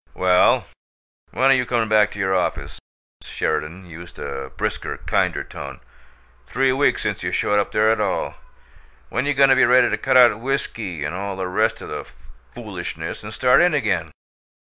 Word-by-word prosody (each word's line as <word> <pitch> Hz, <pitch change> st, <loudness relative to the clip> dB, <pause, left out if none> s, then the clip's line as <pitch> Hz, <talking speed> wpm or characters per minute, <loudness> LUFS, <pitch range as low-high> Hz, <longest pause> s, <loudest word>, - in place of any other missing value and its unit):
"Well, 90 Hz, 0 st, +3 dB, 0.6 s
when 135 Hz, +1 st, +2 dB
are -, -, +7 dB
you 130 Hz, -1 st, +2 dB
comin' 115 Hz, -2 st, 0 dB
back 105 Hz, -1 st, +4 dB
to 105 Hz, -, -10 dB
your 95 Hz, -1 st, +1 dB
office?" 90 Hz, -, -2 dB, 0.4 s
Sheridan 85 Hz, +5 st, -3 dB
used 85 Hz, 0 st, -12 dB
a 70 Hz, -1 st, -6 dB
brisker, -, -, -3 dB
kinder -, -, -1 dB
tone. 70 Hz, -1 st, -9 dB, 0.7 s
"Three 135 Hz, -, +1 dB
weeks 135 Hz, +2 st, +1 dB
since -, -, -2 dB
you -, -, -3 dB
showed 105 Hz, 0 st, +1 dB
up 100 Hz, -, -2 dB
there 110 Hz, +1 st, +3 dB
at 110 Hz, -, 0 dB
all. 100 Hz, -3 st, -1 dB, 0.8 s
When 140 Hz, -, -2 dB
you 145 Hz, -, 0 dB
goin' 135 Hz, 0 st, +5 dB
to 135 Hz, -, +6 dB
be -, -, +4 dB
ready 125 Hz, +1 st, +4 dB
to -, -, 0 dB
cut 130 Hz, -1 st, +2 dB
out 120 Hz, -4 st, +6 dB
whiskey 115 Hz, -, -3 dB
and 75 Hz, +3 st, -3 dB
all 100 Hz, +1 st, -4 dB
the 95 Hz, -1 st, -4 dB
rest 90 Hz, -, 0 dB
o' -, -, -8 dB
the -, -, -5 dB, 0.5 s
foolishness 65 Hz, -, -7 dB
and 105 Hz, -, -8 dB
start 125 Hz, +3 st, +4 dB
in 175 Hz, -2 st, +3 dB
again? 115 Hz, -8 st, -1 dB
105 Hz, 185 wpm, -21 LUFS, 90-130 Hz, 0.8 s, are